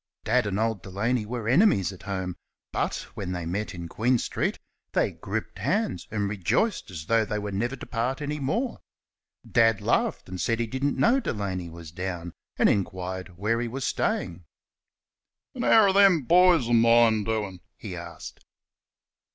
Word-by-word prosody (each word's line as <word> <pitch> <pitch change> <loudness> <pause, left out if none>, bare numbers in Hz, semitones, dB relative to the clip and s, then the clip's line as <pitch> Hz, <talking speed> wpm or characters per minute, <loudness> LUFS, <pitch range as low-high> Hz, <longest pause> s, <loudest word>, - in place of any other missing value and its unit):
Dad 125 -4 +2
and 100 -1 -1
old 110 -3 0
Delaney 105 +5 -1
were 115 -1 -4
enemies 130 - +4
at 95 - -13
home, 95 -3 -4 0.4
but - - -2
when 90 -2 -4
they 90 -2 -4
met 95 +4 -3
in 85 -1 -6
Queen 120 +8 +1
street - - -2 0.4
they - - +2
gripped - - -5
hands 90 - -1
and 105 -2 -1
rejoiced 105 - 0
as 80 -4 -7
though 115 +3 +3
they 105 0 -3
were 105 -1 -4
never 120 +7 -1
to 130 - -9
part 125 +3 -2
any 150 0 -3
more. 225 - -1 0.7
Dad 115 -3 +4
laughed - - 0
and 90 -1 -5
said 115 +4 0
he 120 - +1
didn't 130 +5 -1
know 250 +4 +4
Delaney 95 - -3
was 85 -1 -10
down, 90 -1 -5 0.2
and - - +5
inquired 95 -2 -2
where 110 +5 0
he 120 - -2
was 130 +3 -4
staying. 85 +1 -1 1.1
"An' - - -5
how're 205 -4 +5
them 195 -6 +5
boys 175 -2 +5
o' 120 - +1
mine 115 -1 +5
doin'?" 105 -4 -2 0.2
he 100 -5 -7
asked. 85 -1 -9
110 Hz, 170 wpm, -26 LUFS, 95-125 Hz, 1.1 s, and